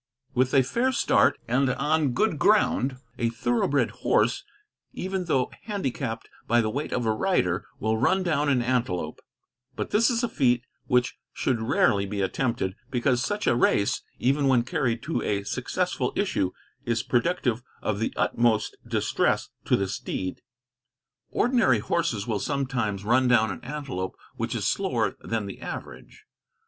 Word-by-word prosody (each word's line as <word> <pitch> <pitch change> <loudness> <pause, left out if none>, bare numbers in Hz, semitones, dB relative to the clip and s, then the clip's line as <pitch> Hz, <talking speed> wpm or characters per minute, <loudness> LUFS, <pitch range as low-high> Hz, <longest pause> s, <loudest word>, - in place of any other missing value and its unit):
With 130 +2 +2
a 135 - +6
fair 240 - +1
start, 260 - +3
and 130 +3 +2
on 150 +1 +1
good 155 - +1
ground, 140 -11 +3 0.2
a 115 - +2
thoroughbred 120 +4 +1
horse, - - +2 0.5
even 190 -1 -3
though 135 -6 +1
handicapped 135 - -3 0.2
by 120 +1 +4
the 110 -2 +1
weight 145 +5 -3
of 125 - -1
a 110 - +3
rider, 105 - 0
will 110 +1 0
run 190 +10 +3
down 150 -4 +1
an 130 -3 +2
antelope; 115 -11 -1 0.5
but - - -4
this 220 +2 +4
is 240 0 0
a - - +2
feat 125 - +2 0.2
which 125 0 +1
should 125 -4 0
rarely 100 -3 +2
be 100 +1 -4
attempted, 115 0 -1 0.2
because 125 -1 +1
such 205 +4 -2
a - - +3
race, 100 -4 +2 0.2
even 140 +3 +2
when 125 -3 +4
carried 120 -2 -1
to 165 - -1
a 100 -1 -1
successful - - -2
issue, 95 - +1 0.3
is 115 -3 0
productive 125 -3 0 0.2
of 105 -1 -1
the 115 - 0
utmost 115 -2 +1
distress - - +1 0.2
to - - +3
the 100 - 0
steed. 95 -1 -4 0.9
Ordinary 235 - +3
horses 115 -3 -1
will 110 -4 -1
sometimes 125 -7 -1
run 125 +3 +3
down 110 -4 +4
an 90 - -8
antelope 130 -9 -4 0.2
which - - -3
is - - -2
slower - - 0
than 115 -2 -3
the 100 - -8
average. - - -8
125 Hz, 155 wpm, -26 LUFS, 110-145 Hz, 0.9 s, a